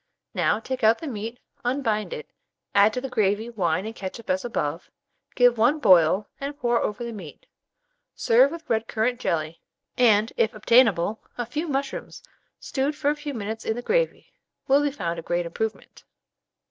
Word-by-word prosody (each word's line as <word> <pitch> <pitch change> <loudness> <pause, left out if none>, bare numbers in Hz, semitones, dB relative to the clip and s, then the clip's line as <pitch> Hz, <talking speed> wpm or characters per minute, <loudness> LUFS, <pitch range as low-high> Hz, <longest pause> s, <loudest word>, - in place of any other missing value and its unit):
Now - - +1
take 255 +2 -5
out 220 +1 +5
the - - -8
meat, 230 -3 -5 0.3
unbind 240 -4 -1
it, 475 -2 -7 0.4
add 200 +2 +6
to 250 - -2
the 270 - -4
gravy 220 -1 0
wine 185 -3 0
and 220 - -5
ketchup 200 +2 -5
as 185 0 0
above, 165 -9 -3 0.5
give 245 -2 +4
one 245 +7 +4
boil, 185 - +5
and 280 +1 -5
pour 240 -2 +1
over 210 +3 -2
the 235 - -4
meat. 180 -8 -10 0.7
Serve 245 +4 +4
with 330 +1 -9
red 225 -2 0
currant 235 +3 0
jelly; 160 -3 -2 0.4
and, 220 -2 +4
if 220 - +1
obtainable, 215 -3 +3 0.2
a 240 - -2
few 300 +8 -3
mushrooms 275 - -4 0.4
stewed 280 +2 -2
for 290 -1 +1
a - - -2
few 295 -2 -6
minutes 220 +1 -4
in 220 - -1
the 245 - -5
gravy, - - 0 0.3
will 275 +2 +5
be 290 - +1
found 170 -12 -4
a - - -5
great 175 +1 -1
improvement. 220 +6 -5
225 Hz, 175 wpm, -25 LUFS, 205-265 Hz, 0.7 s, add